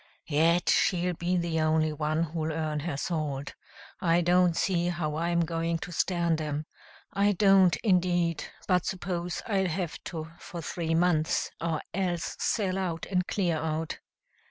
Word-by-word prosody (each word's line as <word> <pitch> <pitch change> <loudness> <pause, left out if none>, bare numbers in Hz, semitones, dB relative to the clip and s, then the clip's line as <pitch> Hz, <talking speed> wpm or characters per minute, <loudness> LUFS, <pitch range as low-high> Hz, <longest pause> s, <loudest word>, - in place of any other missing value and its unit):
"Yet, 165 +3 +2
she'll 180 -1 +2
be 175 +2 -1
the 170 -2 0
only 155 0 +2
one 155 +2 0
who'll 160 -1 -2
earn 155 -1 -2
her 145 -2 -3
salt. 145 -4 -3 0.5
I 170 -2 +3
don't 175 0 +3
see 175 -2 +1
how 155 -3 -2
I'm 170 +1 +1
going 165 0 -1
to 175 - -7
stand 170 -1 +1
'em 150 0 -3 0.5
I 200 +1 +3
don't, 195 -2 +5
indeed, 175 -5 +2 0.2
but 180 -3 +3
suppose 180 -2 -3
I'll 195 -4 +1
have 170 0 -3
to 160 -2 -6
for 175 - -8
three 165 0 -2
months, 165 -2 +2
or 165 -2 -1
else 175 -2 -1
sell 195 -4 0
out 170 -4 -2
and 180 -1 +1
clear 175 -5 0
out." 160 +1 -3
170 Hz, 155 wpm, -28 LUFS, 160-180 Hz, 0.5 s, don't